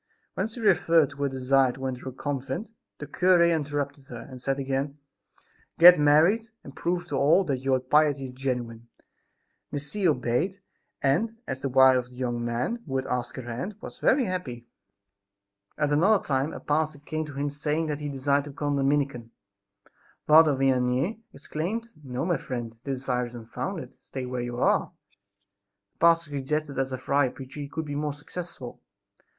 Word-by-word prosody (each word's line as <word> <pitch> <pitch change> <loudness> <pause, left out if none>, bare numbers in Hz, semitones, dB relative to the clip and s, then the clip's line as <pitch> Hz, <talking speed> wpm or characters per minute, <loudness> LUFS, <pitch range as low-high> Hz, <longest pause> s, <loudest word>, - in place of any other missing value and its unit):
When 190 - -1
she 225 +2 -11
referred 165 -8 +4
to 140 - -13
her 140 0 0
desire 130 0 +2
to 135 +1 -7
enter 130 0 -4
a - - -8
convent, 135 - -4 0.3
the 145 - -6
cure 180 +4 +4
interrupted 145 -4 -1
her, 120 -2 -8
and 130 -2 -10
said 135 +1 -1
again: 135 +1 -2 0.8
"Get 175 0 +9
married, 165 +10 +4
and 135 - -11
prove 175 0 -1
to 145 - -2
all 150 +8 +4
that 140 -7 -1
your 130 0 +1
piety 145 +1 +2
is 130 - -7
genuine." 125 -3 -4 0.8
Miss 145 0 -4
C. 205 -3 +1
obeyed 145 +7 0 0.4
and, 215 +12 +1
as 130 - -4
the 135 - -2
wife 130 0 +6
of 125 - -5
the 125 - -16
young 120 -2 -2
man 120 - -2
who 135 - -4
had 130 0 0
asked 125 -1 -3
her 130 - -6
hand, 125 - -5
was - - -10
very 260 -1 +3
happy. 135 - -4 1.1
At 150 -1 +1
another 190 +8 +4
time 135 +2 0
a - - -7
pastor 155 0 0
came 155 +2 -4
to 150 - -9
him 145 +1 -2
saying 150 +2 -1
that 150 -2 -3
he 150 -1 -4
desired 140 +1 +1
to - - -8
become 145 0 -2
a - - +1
Dominican. 135 -4 0 1.0
Father 155 -1 +7
Vianney 135 - +1
exclaimed: 180 +11 -4
"No, 130 +2 -3
my 175 -3 +1
friend, 120 -4 -5
this 135 -2 -3
desire 125 -2 0
is 120 0 -10
unfounded; 125 - -6
stay 130 -1 -6
where 125 0 -3
you 120 0 -4
are." - - +2 1.0
The - - -46
pastor 165 -2 +4
suggested 145 +2 -2
that 135 - 0
as 135 0 -3
a 130 - -2
friar 140 +1 +1
preacher 135 +3 -10
he 140 -1 -5
could 160 +2 -4
be 145 - -5
more 150 0 -2
successful. 145 -4 -8
140 Hz, 185 wpm, -27 LUFS, 130-155 Hz, 1.1 s, Get